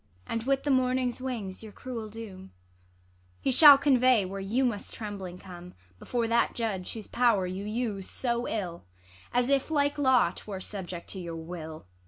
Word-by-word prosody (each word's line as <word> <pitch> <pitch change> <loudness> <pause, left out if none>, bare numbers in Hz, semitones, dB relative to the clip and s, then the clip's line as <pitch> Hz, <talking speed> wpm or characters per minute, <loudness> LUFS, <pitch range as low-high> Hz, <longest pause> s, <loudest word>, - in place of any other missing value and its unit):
ISAB. - - -10
And 230 -1 -1
with 275 0 +2
the 290 - +1
morning's 255 -1 +1
wings 225 -8 -4
your 220 -1 -10
cruel 230 -2 -6
doom 200 -4 -9 0.9
He - - 0
shall 285 +2 +10
convey 255 -6 +4
where 195 +1 -5
you 230 +7 +1
must 215 -5 -3
trembling 195 -5 -6
come, 180 -1 -11 0.2
Before 235 -2 -1
that 235 +1 +2
judge, 205 -6 -2
whose 220 -3 -7
pow'r 230 -6 +2
you 185 +2 -5
use 210 -3 -3
so 240 -1 -1
ill, 180 - -4 0.5
As 245 +2 +1
if, 275 +1 +2
like 285 -1 +1
law, 260 -3 +4
'twere 200 -3 -7
subject 185 -3 -6
to 190 - -4
your 170 -2 -6
Avill. 160 - -8
225 Hz, 175 wpm, -28 LUFS, 190-255 Hz, 0.9 s, shall